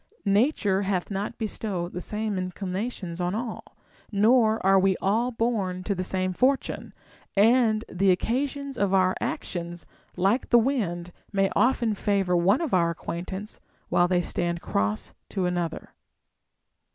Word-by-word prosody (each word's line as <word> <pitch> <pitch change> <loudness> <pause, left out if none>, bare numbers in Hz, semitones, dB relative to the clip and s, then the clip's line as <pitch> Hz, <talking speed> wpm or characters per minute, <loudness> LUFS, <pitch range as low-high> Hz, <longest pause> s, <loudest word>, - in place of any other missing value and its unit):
Nature 200 -2 +2
hath 190 -1 -1
not 200 +2 -3
bestowed 200 -5 -3
the 180 - -4
same 210 +2 -3
inclinations 185 0 -4
on 180 +2 -1
all, 230 0 -4 0.5
nor 220 +1 +4
are 195 0 +6
we 190 0 +2
all 225 +6 +1
born 220 -6 -1
to 200 - -1
the 185 -1 -3
same 185 0 -1
fortune; 265 +7 0 0.4
and 220 +1 +4
the 190 +2 +1
occasions 270 +7 -1
of 195 -1 +2
our 185 -1 +4
actions, 175 -1 -4 0.3
like 195 +8 +1
the 240 - +6
wind, 200 -9 0 0.2
may 195 -1 +1
often 240 -3 +2
favor 195 -3 +1
one 190 - +3
of 320 -6 -2
our 170 -2 +4
acquaintance 185 +5 -5 0.3
Avhile 175 0 +3
they 180 -1 +3
stand 170 0 -2
cross 105 -7 -2 0.2
to 190 -3 -1
another. 175 -2 -3
195 Hz, 140 wpm, -26 LUFS, 180-225 Hz, 0.5 s, are